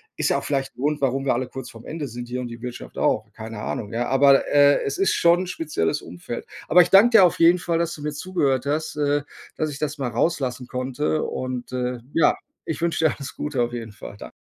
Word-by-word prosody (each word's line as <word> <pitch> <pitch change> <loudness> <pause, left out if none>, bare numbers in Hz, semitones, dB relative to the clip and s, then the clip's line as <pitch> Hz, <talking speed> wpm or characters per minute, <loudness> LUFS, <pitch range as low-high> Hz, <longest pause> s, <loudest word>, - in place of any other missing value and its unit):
Ist - - 0
ja - - +2
auch - - -4
vielleicht 135 -2 -2
'n - - -20
Grund, 150 +2 0
warum 135 0 0
wir 135 - +3
alle 125 +1 -2
kurz 130 -2 -8
vorm 115 0 -13
Ende 155 -2 -4
sind 120 0 -7
hier 125 +1 -4
und 120 - -5
die 115 0 -9
Wirtschaft 125 -1 -7
auch. 110 - +1
Keine 110 -1 -8
Ahnung, 105 - -4
ja, 120 +2 -1
aber, 135 +1 +5
äh, 145 0 +5
es 140 - -3
ist 195 - +3
schon 175 +2 +4
'n - - -10
spezielles 155 - -2
Umfeld. 90 +7 -7 0.2
Aber 180 +2 +7
ich 175 - -6
danke 225 +4 +7
dir 195 - +8
auf 175 - +3
jeden 170 +2 +6
Fall, 170 -1 -1
dass 170 0 -1
du 145 - -10
mir 150 - -2
zugehört 145 -5 -1
hast, 155 +2 -1
äh, 145 0 +1 0.3
dass 155 -1 -1
ich 140 - -8
das 150 0 -2
mal 130 -3 -2
rauslassen 125 -1 -1
konnte 130 +5 -1
und, 130 -1 -4
äh, 125 -1 -2 0.2
ja, 165 - +4 0.3
ich 160 - -3
wünsche 165 -1 +1
dir 155 - +3
alles 140 -1 -7
Gute 150 -4 -3
auf 120 0 -3
jeden 115 -2 -6
Fall. 105 0 -10
Dan - - -9
140 Hz, 250 wpm, -23 LUFS, 125-155 Hz, 0.3 s, dir